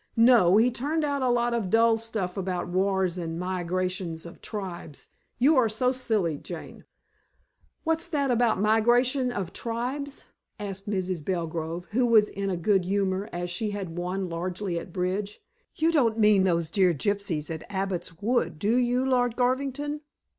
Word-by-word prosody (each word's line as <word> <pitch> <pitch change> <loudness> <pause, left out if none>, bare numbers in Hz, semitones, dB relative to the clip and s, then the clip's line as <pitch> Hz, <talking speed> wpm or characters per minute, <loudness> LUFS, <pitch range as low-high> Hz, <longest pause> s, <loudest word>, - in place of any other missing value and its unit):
"No. 230 -6 +6
He 240 +3 +4
turned 295 +7 -1
out 285 -2 0
a 255 - +2
lot 240 0 +2
of 225 -6 -1
dull 225 +2 +5
stuff 220 -5 -3
about 185 -2 -2
wars 185 0 0
and 165 -1 -4
migrations 180 -2 -2
of 170 - -11
tribes: 185 -8 -7 0.3
you 280 +6 +4
are 240 -3 +4
silly, 220 - 0
Jane." - - -9 1.0
"What's 325 0 0
that 285 -6 0
about 235 -4 +2
migration 240 +5 +3
of 195 -7 -4
tribes?" 255 +5 -4 0.3
asked 200 -1 -6
Mrs. 185 -5 -2
Belgrove, 165 0 -3
who 245 +3 +2
was 220 -3 +5
in 195 0 -3
a 185 - -1
good 190 +2 +2
humor, 195 +1 0
as 175 0 -4
she 210 +5 -2
had 195 -5 -5
won 180 +2 -2
largely 175 +1 -3
at 180 - -10
bridge. 190 +3 -2 0.4
"You 325 +1 +2
don't 240 -9 +2
mean 210 -3 +5
those 170 -3 0
dear 185 -3 +3
gypsies 175 -3 -1
at 160 - -7
Abbot's 190 -4 -3
Wood 230 -5 0
do 210 +8 +1
you, 250 +1 +2
Lord 245 -3 +2
Garvington? 275 +4 -1
205 Hz, 160 wpm, -27 LUFS, 180-245 Hz, 1.0 s, No